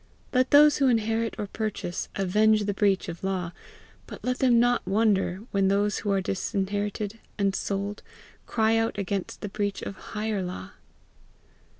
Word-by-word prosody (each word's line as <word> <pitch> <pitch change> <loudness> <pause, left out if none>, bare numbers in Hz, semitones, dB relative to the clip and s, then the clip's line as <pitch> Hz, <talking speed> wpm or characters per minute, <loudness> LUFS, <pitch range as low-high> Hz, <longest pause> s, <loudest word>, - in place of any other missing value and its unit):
Let 255 0 +3
those 295 0 +7
who 275 - +3
inherit 225 -1 +1
or 210 - -2
purchase, 210 -4 -4
avenge 210 +3 +3
the 205 0 -1
breach 195 -1 +1
of 170 +1 -7
law; 185 -3 -2 0.6
but - - -10
let 250 +1 -1
them 245 -3 +5
not 245 -4 +2
wonder 195 -2 +2
when 195 -1 +2
those 205 +1 +1
who 210 - -3
are 195 -1 +2
disinherited 205 +3 -2 0.2
and 200 -1 +1
sold, 200 +1 -3 0.5
cry 225 0 +2
out 225 -1 0
against 200 -1 -3
the 205 - -4
breach 205 0 -2
of 200 - -5
higher 215 -2 -3
law! 185 +1 -6
205 Hz, 160 wpm, -27 LUFS, 195-225 Hz, 0.6 s, those